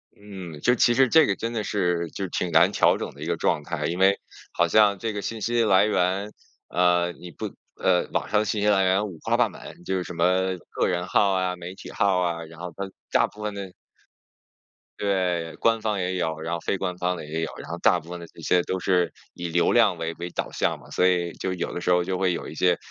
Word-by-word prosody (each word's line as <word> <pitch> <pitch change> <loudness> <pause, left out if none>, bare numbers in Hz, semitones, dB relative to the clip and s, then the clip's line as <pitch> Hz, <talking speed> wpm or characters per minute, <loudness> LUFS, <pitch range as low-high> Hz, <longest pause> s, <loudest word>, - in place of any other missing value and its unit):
嗯， 95 -6 -9
就 125 - +4
其 120 - +4
实 130 +1 +4
这 160 +3 +6
个 100 - +1
真 115 +3 -4
的 110 -2 -2
是， 90 -5 0
就 95 - -4
挺 90 0 -2
难 85 +4 +5
调 - - +3
整 - - -5
的 - - -14
一 - - -4
个 - - -1
状 75 - +1
态， 75 -1 -3
因 85 +4 -2
为 95 +1 +4 0.3
好 85 - +2
像 105 +2 +4
这 110 +2 -3
个 105 - -3
信 115 +2 -5
息 120 +2 +1
来 100 -3 +5
源， 100 0 0 0.4
呃， 90 -1 +2
你 90 - -11
不 - - -6 0.2
呃， 90 -1 +2
网 - - -1
上 105 - +3
的 110 - 0
信 105 0 -1
息 105 - +2
来 100 -2 +4
源 95 +2 +2
五花八门， 85 -6 -1
就 95 - -1
是 90 - -2
什 90 - -8
么 95 +2 +2
个 - - 0
人 90 -1 -1
号 100 +2 +3
啊、 95 -1 0
媒 90 +1 -8
体 - - -10
号 100 -4 +2
啊， 85 -2 -1
然 80 +1 -14
后 90 -1 -6
它 100 0 -5 0.2
大 - - +4
部 105 - -14
分 105 -1 -2
的 100 -2 -6 1.3
对， 90 -5 0
官 115 0 +2
方 105 -2 -1
也 90 0 -1
有， 80 -3 -2
然 80 +1 -3
后 - - -4
非 90 - -1
官 90 -1 -3
方 90 0 0
的 85 - -7
也 80 +2 -3
有， 80 - -3
然 - - -9
后 - - -4
大 90 - +3
部 85 0 -15
分 90 0 -6
的 85 - -8
这 85 - -15
些 90 +2 +2
都 95 - -2
是 90 -2 +1 0.2
以 85 - -4
流 85 +1 +2
量 110 -7 +4
为 80 0 -2
为 85 +1 -5
导 - - -3
向 - - -1
嘛。 - - -16
所 90 - +1
以 90 -2 +1
就 95 - -3
有 90 - -3
的 - - -3
时 90 - +1
候 90 0 +4
就 95 +1 -2
会 90 -1 +1
有 - - -5
一 - - -9
些， 90 -1 +3
90 Hz, 280 characters per minute, -25 LUFS, 85-100 Hz, 1.3 s, 这